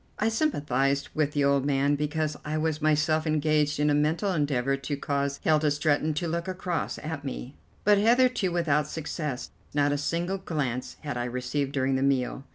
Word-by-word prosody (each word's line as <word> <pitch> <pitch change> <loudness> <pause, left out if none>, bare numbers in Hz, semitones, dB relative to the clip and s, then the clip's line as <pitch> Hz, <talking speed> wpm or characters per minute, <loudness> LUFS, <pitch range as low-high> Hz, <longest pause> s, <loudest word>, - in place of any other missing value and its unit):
I 215 - +2
sympathized 140 - 0
with 150 -2 0
the 145 - +1
old 140 -1 +3
man, 140 0 +2
because 150 +1 -1
I 150 +1 -2
was 155 0 -1
myself 155 +1 +2
engaged 150 -1 +1
in 150 0 +3
a - - +3
mental 160 +7 +1
endeavour 135 -4 +1
to 135 +1 -4
cause 140 0 -1
Hilda 155 -1 +3
Stretton 150 +1 +1
to 170 +3 -1
look 170 +2 -2
across 185 -2 -2
at 155 -2 -5
me, 135 -1 -6 0.3
but 205 0 +5
hitherto 240 -3 +3
without 150 -4 +1
success. 150 -4 -4 0.2
Not 145 0 +3
a 145 - 0
single 170 +6 -1
glance 135 -9 -3
had 145 -4 -4
I 120 - -1
received 125 +3 -2
during 130 -1 +1
the - - -1
meal. 135 -1 0
150 Hz, 180 wpm, -27 LUFS, 140-160 Hz, 0.3 s, but